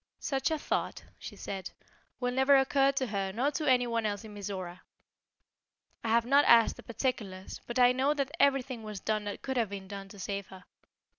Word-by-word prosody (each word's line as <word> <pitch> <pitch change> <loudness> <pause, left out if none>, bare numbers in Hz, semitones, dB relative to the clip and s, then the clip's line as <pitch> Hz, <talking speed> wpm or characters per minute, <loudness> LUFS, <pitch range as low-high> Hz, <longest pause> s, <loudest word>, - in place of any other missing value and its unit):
"Such 270 0 -1
a 320 - 0
thought," - - -2 0.2
she - - -8
said, 195 -2 -6 0.5
"will 245 -1 -1
never 265 +2 +5
occur 270 +1 +3
to 270 -1 0
her 200 -4 -2
nor 250 +8 0
to 300 +1 -3
any 250 -1 +4
one 230 -1 -1
else 205 +1 -3
in 215 -1 -10
Mizora. 190 -3 -6 1.2
I 225 - -2
have 230 +1 +3
not 280 +3 +5
asked 230 -1 +6
the - - -9
particulars, 215 -6 -4
but 240 - -4
I 245 -1 +6
know 270 +4 +1
that 275 -1 -1
everything 270 -3 +2
was 215 -2 -6
done 215 0 -1
that 205 - -6
could 265 -1 -2
have 230 -4 +1
been 195 -1 -7
done 195 0 -7
to 205 - -12
save 200 +1 -4
her. 190 -1 -13
235 Hz, 205 wpm, -30 LUFS, 200-265 Hz, 1.2 s, asked